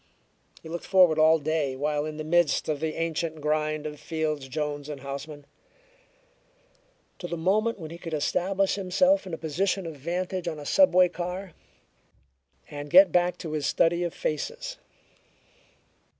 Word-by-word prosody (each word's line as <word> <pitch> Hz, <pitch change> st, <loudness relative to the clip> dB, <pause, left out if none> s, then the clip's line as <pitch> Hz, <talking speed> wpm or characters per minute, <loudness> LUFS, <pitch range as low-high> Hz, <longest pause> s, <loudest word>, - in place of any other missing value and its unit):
He -, -, -9 dB
looked 170 Hz, +1 st, -6 dB
forward 180 Hz, -5 st, +5 dB
all 160 Hz, +1 st, +6 dB
day, 150 Hz, -3 st, -1 dB
while 150 Hz, +2 st, -1 dB
in 155 Hz, -1 st, -6 dB
the 155 Hz, -, -4 dB
midst 170 Hz, 0 st, +2 dB
of 150 Hz, -2 st, -1 dB
the 160 Hz, -1 st, -2 dB
ancient 165 Hz, -1 st, -2 dB
grind 155 Hz, 0 st, -1 dB
of 150 Hz, -1 st, -6 dB
Fields, 155 Hz, -3 st, -3 dB
Jones 145 Hz, 0 st, -4 dB
& 150 Hz, -2 st, -6 dB
Houseman, 140 Hz, +2 st, -7 dB, 1.7 s
to 175 Hz, -, -5 dB
the 170 Hz, 0 st, -4 dB
moment 215 Hz, +7 st, +1 dB
when 160 Hz, -4 st, -8 dB
he 170 Hz, -, -9 dB
could 165 Hz, -3 st, -4 dB
establish 190 Hz, +6 st, 0 dB
himself 200 Hz, +8 st, +2 dB
in 180 Hz, -, -7 dB
a -, -, -11 dB
position 180 Hz, +5 st, -1 dB
of 165 Hz, -2 st, -6 dB
vantage 180 Hz, +5 st, -3 dB
on 160 Hz, -2 st, -3 dB
a 145 Hz, -, -9 dB
subway 185 Hz, -, +5 dB
car, 180 Hz, +1 st, -5 dB, 1.2 s
and 145 Hz, 0 st, -7 dB
get 185 Hz, +2 st, +8 dB
back 180 Hz, 0 st, +2 dB
to 165 Hz, -4 st, -6 dB
his 150 Hz, -2 st, -1 dB
study 170 Hz, +3 st, +2 dB
of 175 Hz, -, -2 dB
faces. -, -, -4 dB
160 Hz, 160 wpm, -26 LUFS, 150-180 Hz, 1.7 s, get